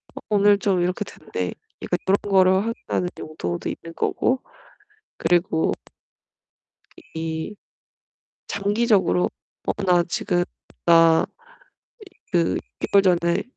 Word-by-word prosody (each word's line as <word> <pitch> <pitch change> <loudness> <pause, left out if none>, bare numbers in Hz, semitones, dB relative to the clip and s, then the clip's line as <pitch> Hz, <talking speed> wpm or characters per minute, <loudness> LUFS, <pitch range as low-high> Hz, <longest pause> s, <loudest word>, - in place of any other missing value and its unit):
어 - - -6
오늘 205 -1 +5
좀 195 -3 +1
이렇게 180 +4 0
됐네. 90 - -5 0.3
이제 - - -5 0.2
그런 195 +1 +4
거를 190 -2 +4
확인하는 225 -5 -2
용도도 90 - -4
있는 165 0 -7
거고. 255 +1 0 0.8
그리고 170 -1 +2 1.4
이 160 +5 -4 0.9
장기적으로 205 -2 +2 0.4
'어 - - +2
나 175 -2 +4
지금 175 +1 0 0.4
나 165 -1 +6 1.1
그 170 -2 +2
6 - - -1 0.3
개월 200 -1 +6 0.2
전에 170 +3 0
180 Hz, 200 characters per minute, -23 LUFS, 165-200 Hz, 1.4 s, 나